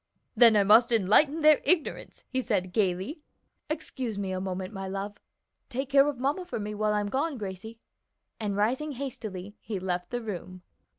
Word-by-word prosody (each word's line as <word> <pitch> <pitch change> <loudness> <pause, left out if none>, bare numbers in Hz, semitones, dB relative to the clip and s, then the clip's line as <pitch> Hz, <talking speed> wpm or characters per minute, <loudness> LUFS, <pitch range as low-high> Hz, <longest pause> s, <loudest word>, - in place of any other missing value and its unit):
"Then 230 -3 +7
I 205 - +5
must 225 +5 +6
enlighten 235 - +4
their 305 -1 +6
ignorance," 345 -5 -1
he 260 - -1
said 185 -6 -1
gayly. 195 - -1 0.5
"Excuse 265 -8 -4
me 195 -2 -3
a 185 0 -2
moment, 185 +1 -4
my 195 -1 -5
love. 195 +2 -5 0.5
Take 265 +2 -3
care 275 0 +6
of 285 -4 -3
mamma 285 +8 0
for 355 -10 -5
me 210 0 -4
while 210 0 0
I'm 205 -1 0
gone, 280 +4 -1
Gracie," 210 +2 -7 0.6
and 205 -2 -2
rising 260 +8 0
hastily 215 -7 -6
he 215 - -4
left 180 -1 -3
the 245 -1 -3
room. 185 -3 -7
215 Hz, 175 wpm, -28 LUFS, 195-265 Hz, 0.6 s, Then